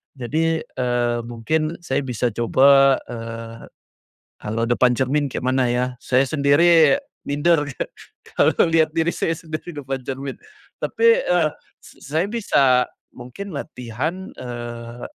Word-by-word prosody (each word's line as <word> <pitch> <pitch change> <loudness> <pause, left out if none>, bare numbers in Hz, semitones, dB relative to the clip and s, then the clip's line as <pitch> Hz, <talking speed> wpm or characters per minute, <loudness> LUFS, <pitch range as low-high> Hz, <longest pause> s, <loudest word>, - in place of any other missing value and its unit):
jadi, 160 +6 -1
eee, 120 -1 -1
mungkin 155 +8 -1
saya 135 - 0
bisa 125 -3 -2
coba, 135 +4 +5 0.2
eee, 115 0 -8 0.8
kalau 115 +2 -1
depan 125 +1 +3
cermin 135 +3 0
kayak - - -4
mana 130 -2 +2
ya? 125 +1 +1 0.2
Saya 130 +1 +2
sendiri 160 - +4 0.3
minder 145 +1 +2
ka - - -2 0.5
kalau - - +4
lihat 160 -1 +3
diri 165 0 0
saya 165 - -1
sendiri 160 +1 -7
depan 135 -3 -5
cermin 135 +1 -5 0.5
tapi, 465 +2 +3
eee, 170 -3 +2 0.3
s - - -17
saya 160 +5 +1
bisa 135 - +3 0.3
mungkin 125 +12 -8
latihan 140 - -5
eee, 120 -1 -7
135 Hz, 125 wpm, -21 LUFS, 120-160 Hz, 0.8 s, coba